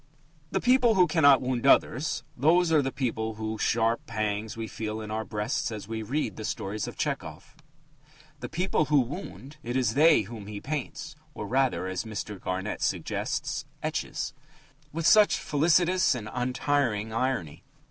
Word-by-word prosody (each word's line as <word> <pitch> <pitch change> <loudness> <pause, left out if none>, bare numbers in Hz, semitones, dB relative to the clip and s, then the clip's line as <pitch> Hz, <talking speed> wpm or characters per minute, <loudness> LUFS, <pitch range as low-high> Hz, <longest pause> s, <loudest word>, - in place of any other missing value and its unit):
The - - 0
people 250 -2 +4
who 180 -1 +6
cannot 145 -7 +5
wound 125 0 -1
others 155 +3 +3
those 165 +6 +3
are 155 -2 +5
the 135 -1 -2
people 110 -4 -2
whose 110 0 -4
sharp 115 0 +1
pangs 110 -1 -2
we 115 -1 -4
feel 110 0 -4
in 110 -1 -6
our 110 +1 -2
breasts 110 +8 -2
as 105 -3 -6
we 110 0 -4
read 135 +8 -2
the 110 - -6
stories 105 0 -3
of - - -8
Tchehov. - - -4 0.8
The 120 -2 -6
people 175 -2 0
who 150 -1 +4
wound 140 +1 -5
it 120 +1 -2
is 125 -4 +1
they 155 +3 +6
whom 105 -1 -9
he 105 -1 -6
paints 150 +4 -5 0.2
(or, - - -5
rather, 130 -3 +1
as 95 0 -3
Mr. 105 -3 -6
Garnett 95 +3 -3
suggests, - - -2 0.2
etches) - - -3 0.6
with 165 +1 -3
such 210 +3 +6
felicitous 175 +3 +3
and 110 -4 -6
untiring 125 -3 0
irony. 115 - -2
125 Hz, 160 wpm, -27 LUFS, 110-150 Hz, 0.8 s, who